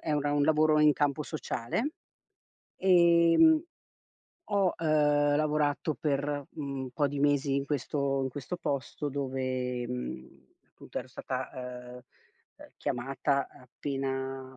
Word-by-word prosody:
è 155 - -2
un 150 - +2
ran 145 0 0
un 145 - +3
lavoro 155 0 +4
in 150 -1 +6
campo 145 +1 0
sociale. 155 - -3 0.9
Ehm, 175 - +5 0.8
ho, 200 -3 +1
uhm, 150 -2 +3
lavorato 150 0 +1
per, 145 -2 -1
mhmm, 140 -3 -5
un 130 - -7
po' 145 +1 +1
di 145 +1 -4
mesi 145 -1 +2
in 140 - -1
questo 140 -1 -1
in 130 - -1
questo 145 +7 -5
posto 145 0 -3
dove, 130 -2 -2
mhmm, 65 - -7 0.2
appunto - - -8
ero - - -7
stata, - - -5
uhm 125 -1 -7
uhm, - - -11 0.8
chiamata 135 +1 -1
appena 135 0 -5
145 Hz, 130 wpm, -29 LUFS, 130-150 Hz, 0.9 s, in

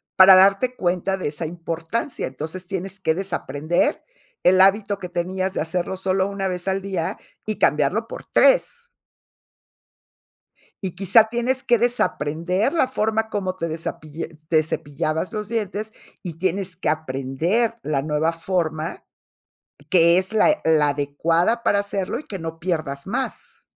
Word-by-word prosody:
Para 190 0 +9
darte 200 +7 +4
cuenta 185 0 0
de 185 - -2
esa 150 +3 -5
importancia. 170 - -4
Entonces, 160 +7 -7
tienes 195 +1 -5
que 160 -4 +1
desaprender 175 - -1 0.4
el 185 +1 +6
hábito 200 +1 +4
que 180 - -6
tenías 185 +2 -2
de - - -1
hacerlo 175 +3 -2
solo 190 0 +1
1 200 -1 -3
vez 180 0 -4
al 190 0 0
día 190 0 -3 0.3
y 215 -1 -3
cambiarlo 150 +11 +2
por - - -8
3. 485 -1 +2 1.9
Y 185 - -4
quizá 200 +3 +5
tienes 245 +3 -1
que 240 -1 +3
desaprender 185 - 0
la 320 -6 +2
forma 220 -2 0
como 190 -3 -2
te 170 -2 -3
desapille 160 0 -5 0.2
te 155 -2 +3
cepillabas 155 +3 -3
los 210 -2 -4
dientes 215 -1 -3 0.3
y 170 - -5
tienes 185 0 -1
que 185 - -3
aprender 155 - 0
la 145 -3 0
nueva 155 +2 0
forma, 165 -2 -2 0.9
que 170 -1 +5
es 185 +2 -2
la 220 +5 +4
e 305 - 0
la 155 -2 +4
adecuada 165 +10 0
para 200 - +3
hacerlo 200 +3 -3
y - - -14
que 195 - -7
no 165 -1 -6
pierdas 155 -4 -3
más. 250 +5 -4
185 Hz, 150 wpm, -22 LUFS, 160-205 Hz, 1.9 s, Para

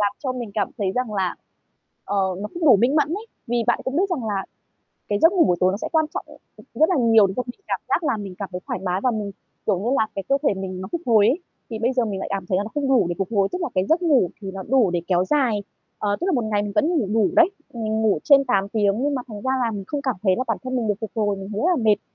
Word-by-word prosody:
làm 205 -1 +2
cho 260 -4 -2
mình 240 -4 -5
cảm 205 -3 0
thấy 190 -2 0
rằng 250 -4 -2
là, 185 -3 0 0.7
ờ, 200 +1 -2 0.2
nó 210 - -4
không 345 -1 -3
đủ 250 - +8
minh 255 +8 +2
mẫn 295 -1 +3
ấy, 415 +7 -4 0.2
vì 235 -1 0
bạn 240 - +3
cũng 265 +3 -2
biết 385 +2 +1
rằng 260 -10 -2
là 200 -2 -1 0.7
cái 205 0 +1
giấc 330 +4 +5
ngủ 355 - +5
buổi 180 - +2
tối 185 0 +3
nó 200 - -2
sẽ - - -5
quan 315 -1 +3
trọng, - - -4
ừm, - - -14 0.2
ừm, - - -15 0.2
rất 315 - +6
là 365 - +2
nhiều 225 -4 +5
để 190 - -4
cho 250 - 0
mình 245 +9 -9
cảm - - -1
giác 345 - +1
là 230 - +1
mình 195 -3 -7
cảm 200 - -5
thấy 180 - -5
thoải - - -3
mái 185 +1 -1
và, 255 - +3 0.5
kiểu 200 -4 +1
như 220 +5 -2
là, 220 - +2
cái 195 - -3
cơ 275 - +4
thể 280 - +3
mình 185 -1 -5
nó 190 - -5
phục 340 - -2
hồi 220 -3 +5
ấy, 275 +9 +2 0.3
thì 220 - -5
bây 240 +4 +1
giờ 250 -2 +1
mình 195 -3 -3
lại - - -5
cảm 195 -2 -2
thấy 185 - +1
là 200 - 0
nó 220 - -7
không 290 -2 -1
đủ 260 -8 +4
để 175 - -2
phục 195 -2 -1
hồi, 200 -3 +2
tức 360 - -3
là 345 - 0
cái 185 +1 +2
giấc 335 +3 +3
ngủ 275 - +3
thì 195 -1 -5
nó 190 -1 -6
đủ 240 -7 +3
để 175 -1 0
kéo 180 -1 +2
dài, 235 -6 +1 0.3
ờ, 205 -1 0
tức - - 0
là 385 - +1
một 245 - +1
ngày 210 -1 0
mình 205 - -4
vẫn 315 +1 +3
ngủ 235 -9 0
đủ 220 -3 +3
đấy, 335 +3 +6 0.2
mình 220 -1 -2
ngủ 210 -8 +2
trên 275 -1 +6
8 200 -4 +1
tiếng 210 +1 +1
nhưng 290 0 +1
mà 255 - -2
thành 210 -2 -8
ra 260 - -1
là 230 - -1
mình 200 -2 -5
không 290 -1 -3
cảm 260 -4 -1
thấy 185 -2 +3
là 255 - 0
bản 225 - 0
thân 255 0 -3
mình 235 -3 0
được 210 - +2
phục 220 - -4
hồi, 205 -2 +1
mình 195 0 -7
thấy 205 - -2
rất 355 - +3
là 235 - -2
mệt. 210 -2 +3
220 Hz, 320 wpm, -23 LUFS, 200-265 Hz, 0.7 s, đủ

